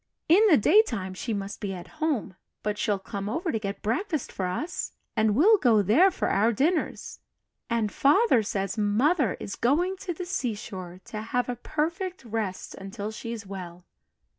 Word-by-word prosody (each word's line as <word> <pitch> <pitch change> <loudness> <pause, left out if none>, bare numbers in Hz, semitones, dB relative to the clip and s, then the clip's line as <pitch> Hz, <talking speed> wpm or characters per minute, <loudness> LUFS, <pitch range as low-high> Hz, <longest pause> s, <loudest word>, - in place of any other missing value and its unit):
In 350 +6 +6
the 315 - +7
daytime, 230 - +3
she 225 +5 -4
must 200 -1 -4
be 195 -2 -3
at 185 - -11
home; 270 - 0 0.3
but 210 0 -2
she'll 205 -2 +1
come 195 +1 -5
over 330 - -1
to 225 - -1
get 200 -1 -5
breakfast 295 - -1
for 185 - -2
us, 285 - -3 0.2
and 215 -2 +2
we'll 405 - +6
go 225 - +4
there 280 - +5
for - - -2
our 215 +4 +3
dinners 310 - -1 0.5
and 230 -3 0
Father 290 - +4
says 195 0 -2
Mother 235 - +2
is - - -5
going 350 +10 +1
to 375 -1 -5
the 350 +2 -5
seashore 205 - -4
to 215 - -6
have 245 +3 -1
a 245 - -1
'perfect 330 - -3
rest' 215 -4 -3
until 200 +2 -6
she's 230 -1 -6
well. 180 -2 -8
225 Hz, 170 wpm, -27 LUFS, 200-315 Hz, 0.5 s, the